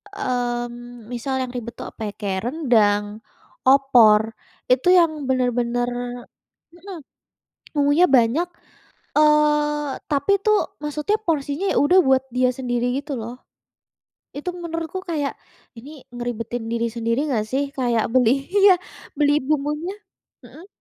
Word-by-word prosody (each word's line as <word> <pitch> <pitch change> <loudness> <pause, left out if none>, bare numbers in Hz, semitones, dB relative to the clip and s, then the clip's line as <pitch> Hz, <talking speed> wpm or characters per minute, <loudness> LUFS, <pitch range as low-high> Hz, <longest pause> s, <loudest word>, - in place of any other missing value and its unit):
mmm, 240 - -4
misal 265 +2 -3
yang 255 -1 -4
ribet 240 -2 -6
tuh - - -7
apa, 215 -2 -5
kayak 200 0 -3
rendang, 215 -8 +1 0.5
opor, 230 -5 +5 0.4
itu 260 +7 +2
yang 320 -5 +3
benar-benar 245 -1 0 0.8
mhm, 365 +1 -10 0.8
bumbunya 290 +4 +4
banyak, 260 +6 +3 0.7
eee, 300 -1 +3 0.2
tapi 290 +8 +2
tu 425 - +4 0.3
maksudnya 300 +8 -1
porsinya 300 +1 -1
ya - - 0
udah 360 +6 +5
buat 265 0 +3
dia 250 0 +2
sendiri 245 -1 -1
gitu 285 -3 -5
loh. 235 +3 -8 1.0
Itu 295 +5 -3
menurutku 330 +1 -5
kayak, 300 -5 -2 0.4
ini 280 +3 -12
ngeribetin 240 -1 -4
diri 235 0 -1
sendiri 235 +5 -1
nggak 225 -6 0
sih, 270 +4 0
kayak 240 -4 0
beli 250 -3 +4 0.2
iya, 400 -1 +7 0.4
beli 290 0 +3
bumbunya 300 +5 -2 0.5
mhm. 345 +4 -14
265 Hz, 120 wpm, -22 LUFS, 240-300 Hz, 1.0 s, iya